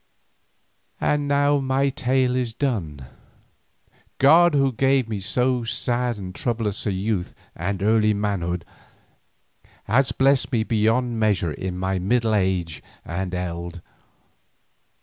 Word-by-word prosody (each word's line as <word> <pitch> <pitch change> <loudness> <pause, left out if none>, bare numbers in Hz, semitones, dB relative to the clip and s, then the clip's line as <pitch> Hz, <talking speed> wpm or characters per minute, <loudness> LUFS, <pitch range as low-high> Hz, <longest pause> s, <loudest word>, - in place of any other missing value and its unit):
And 145 -1 0
now 145 0 +3
my 135 +1 +1
tale 130 -2 0
is 125 -3 -1
done. 85 - -3 1.1
God 160 +4 +6
who 135 -1 +3
gave 135 0 +2
me 110 -3 -3
so 125 +5 0
sad 120 +1 -1
and 95 -2 -7
troublous 115 -6 -2
a - - +1
youth 95 -1 -2 0.2
and 95 +3 -3
early 105 0 +3
manhood, 90 -4 -2 1.2
has 125 +6 +2
blessed 135 0 +2
me 115 -4 +1
beyond 115 +2 +1
measure 100 -7 +1
in 90 +4 -5
my 95 0 -1
middle 115 +4 +1
age 95 -5 0 0.2
and 90 +2 -4
eld. 85 -1 -5
110 Hz, 120 wpm, -23 LUFS, 95-130 Hz, 1.2 s, God